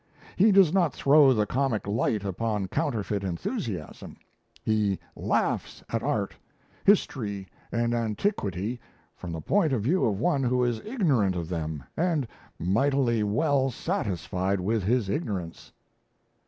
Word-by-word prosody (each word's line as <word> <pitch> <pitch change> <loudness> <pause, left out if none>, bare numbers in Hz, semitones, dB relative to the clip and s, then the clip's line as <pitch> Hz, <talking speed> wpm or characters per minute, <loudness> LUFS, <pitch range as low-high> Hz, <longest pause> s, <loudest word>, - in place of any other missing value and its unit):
He 210 +4 +5
does 190 -5 +5
not 175 -6 +2
throw 140 -1 +6
the 105 -4 +2
comic 130 -2 -1
light 105 0 0
upon 100 0 -2
counterfeit 110 - -1
enthusiasm; 90 -3 -4 0.5
he 105 -3 +1 0.2
laughs - - -1
at - - -1
art, - - -1 0.5
history, 105 - +1 0.2
and 115 0 0
antiquity 115 - -1 0.4
from 90 - -7
the 80 -1 -5
point 175 - +2
of 115 -6 0
view 170 - +2
of 100 -3 +1
one 155 -1 +1
who 125 -1 +2
is 120 -2 0
ignorant 145 - +1
of 85 -2 -4
them 80 -5 -3
and 160 -6 0 0.3
mightily 120 - +2
well 135 +6 +2
satisfied 100 - -2
with 105 +4 0
his 115 +1 +1
ignorance." 95 - -4
115 Hz, 130 wpm, -27 LUFS, 100-140 Hz, 0.5 s, throw